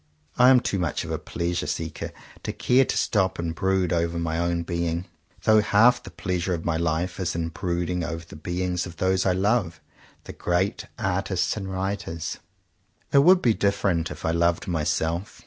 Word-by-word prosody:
I 125 +1 +6
am 130 -2 +6
too 100 - -1
much 90 -4 -1
of - - -6
a - - -2
pleasure 85 0 -3
seeker 80 -1 -4 0.3
to - - -3
care 130 +2 +3
to - - -2
stop 95 -3 +1
and 85 -1 -2
brood 95 0 +1
over 85 0 0
my 80 -1 -1
own 85 0 0
being; 85 0 -2 0.4
though 110 -1 +5
half 115 +4 +4
the - - -10
pleasure 90 -2 -2
of 80 - -7
my 85 - +1
life 85 +3 -1
is 90 -3 -1
in 85 -1 -1
brooding 90 +1 -2
over 80 0 -4
the 85 - -12
beings 90 +3 -2
of 85 -1 -11
those 95 +1 +1
I 90 - +3
love 95 -3 +1 0.2
— - - -28
the - - -9
great 90 +3 -1
artists 95 -1 0
and 95 -3 -5
writers. 95 -4 -3 0.7
It 140 - +7
would 180 +5 +6
be 115 - +4
different 95 -5 +1
if - - -7
I 80 - +2
loved 85 0 +1
myself. 85 +3 -1
90 Hz, 190 wpm, -25 LUFS, 85-95 Hz, 0.7 s, It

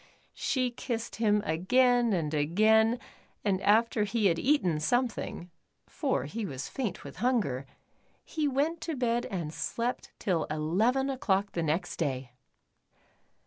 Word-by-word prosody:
She 255 -2 0
kissed 235 -1 -4
him 210 -2 +2
again 240 +8 +3
and 160 -5 0
again 215 +10 +3 0.5
and 195 -2 +1
after 220 +1 +3
he 210 +1 0
had 170 -3 +3
eaten 190 - +2
something, 230 -2 -1 0.3
for - - -1
he 220 +10 -4
was 135 -8 -4
faint 220 -8 -4
with - - -10
hun 250 +1 +2
ger, 135 -2 -4 0.6
he 310 -2 -1
went 295 +5 0
to 320 -1 -3
bed 240 -2 0
and 170 -5 -4
slept 235 +7 -3
till 175 -5 0
eleven 200 - +1
o'clock 200 -6 0
the 170 - -2
next 165 +3 -1
day. 130 -5 -2
210 Hz, 140 wpm, -29 LUFS, 165-245 Hz, 0.6 s, again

